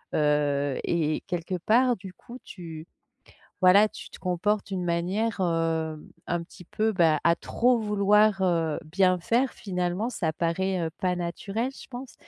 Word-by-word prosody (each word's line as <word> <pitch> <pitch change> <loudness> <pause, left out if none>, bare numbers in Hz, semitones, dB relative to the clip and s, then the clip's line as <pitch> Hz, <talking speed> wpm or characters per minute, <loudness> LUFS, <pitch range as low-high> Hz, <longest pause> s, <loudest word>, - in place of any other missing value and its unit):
Heu 145 -2 +1
et 155 -2 0
quelque 180 0 -3
part 245 +7 +3
du 190 0 -9
coup 240 +6 -12
tu 165 -3 -9 0.8
voilà, 200 +4 +7
tu - - -11
te - - -12
comportes 195 +3 0
d'une 190 -2 -3
manière, 185 +7 -1
hem, 165 -3 -1 0.2
un 175 -1 -1
petit 180 +1 -14
peu 215 +5 0
bah, 165 -6 +3
à 170 +1 +4
trop 245 +6 +1
vouloir, 210 -1 +3
heu, 165 -4 +1
bien 185 +3 +2
faire, 240 +8 +1
finalement, 180 +3 -2
ça 165 -9 -1
paraît, 180 +3 -1
heu, 165 -1 -2
pas 185 -3 0
naturel 195 +7 -3
je - - -12
pense 255 0 -8
180 Hz, 155 wpm, -26 LUFS, 165-210 Hz, 0.8 s, voilà